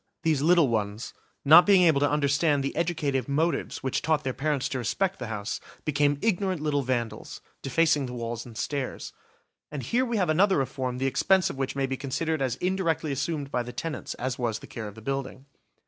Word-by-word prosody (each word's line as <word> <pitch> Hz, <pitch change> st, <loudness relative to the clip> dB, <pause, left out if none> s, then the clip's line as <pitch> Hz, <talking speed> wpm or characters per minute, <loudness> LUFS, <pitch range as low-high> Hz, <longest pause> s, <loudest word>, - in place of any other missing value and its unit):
These 155 Hz, -4 st, +2 dB
little 170 Hz, -1 st, +5 dB
ones, 110 Hz, -1 st, -2 dB, 0.3 s
not 160 Hz, +5 st, +9 dB
being 195 Hz, -3 st, +6 dB
able 160 Hz, -5 st, +4 dB
to 145 Hz, -, +2 dB
understand 145 Hz, 0 st, +2 dB
the 140 Hz, -, -3 dB
educative 150 Hz, -6 st, -1 dB
motives 160 Hz, +5 st, -1 dB
which 130 Hz, -, -1 dB
taught 155 Hz, -1 st, +1 dB
their 130 Hz, -2 st, -2 dB
parents 145 Hz, -1 st, -1 dB
to 130 Hz, -, -3 dB
respect 190 Hz, -, -1 dB
the 125 Hz, -, -5 dB
house, 105 Hz, -1 st, -4 dB, 0.3 s
became 145 Hz, -1 st, +2 dB
ignorant 190 Hz, -4 st, +1 dB
little 150 Hz, -1 st, 0 dB
vandals, 120 Hz, -3 st, -3 dB, 0.2 s
defacing 150 Hz, 0 st, +2 dB
the 125 Hz, -, -7 dB
walls 115 Hz, -1 st, -4 dB
and 115 Hz, -3 st, -12 dB
stairs. 140 Hz, 0 st, -4 dB, 0.6 s
And 145 Hz, -3 st, -5 dB
here 240 Hz, -, +1 dB
we 235 Hz, -3 st, -1 dB
have 180 Hz, -5 st, +1 dB
another 190 Hz, +5 st, +4 dB
reform 130 Hz, -2 st, -2 dB
the 130 Hz, -, -1 dB
expense 180 Hz, +8 st, +2 dB
of -, -, -10 dB
which 135 Hz, 0 st, -2 dB
may 135 Hz, -1 st, 0 dB
be 135 Hz, 0 st, -3 dB
considered 145 Hz, +3 st, -2 dB
as 130 Hz, -4 st, 0 dB
indirectly 180 Hz, -4 st, -1 dB
assumed 140 Hz, +1 st, -3 dB
by 125 Hz, -, 0 dB
the 120 Hz, 0 st, -6 dB
tenants 160 Hz, +5 st, -5 dB
as 130 Hz, 0 st, -3 dB
was 115 Hz, -3 st, -1 dB
the -, -, -12 dB
care 110 Hz, -2 st, -7 dB
of 105 Hz, -, -10 dB
the 110 Hz, -, -12 dB
building. 135 Hz, 0 st, -4 dB
140 Hz, 205 wpm, -27 LUFS, 130-160 Hz, 0.6 s, not